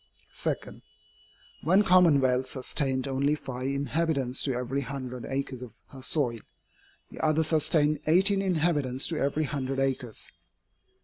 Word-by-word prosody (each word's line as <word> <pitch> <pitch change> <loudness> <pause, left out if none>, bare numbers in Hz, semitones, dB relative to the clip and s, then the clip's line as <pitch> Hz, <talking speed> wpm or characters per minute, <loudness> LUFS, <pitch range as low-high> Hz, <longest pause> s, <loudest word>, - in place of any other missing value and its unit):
2. - - 0 1.1
One 185 +7 +4
commonwealth 140 -9 +4
sustained 130 0 -1
only 140 +2 +1
five 130 -3 -5
inhabitants 140 -1 0
to 135 -3 0
every 125 +3 -2
hundred 125 -2 -6
acres 135 -2 -3
of 125 -4 -9 0.2
her 135 - -11
soil, 125 -4 0 0.7
the - - -7
other 155 0 +3
sustained 155 -1 +2
eighteen 195 +5 +4
inhabitants 155 -8 +1
to 160 -3 -2
every 140 +3 0
hundred 135 -2 -3
acres. 130 -4 -3
140 Hz, 125 wpm, -28 LUFS, 130-155 Hz, 1.1 s, One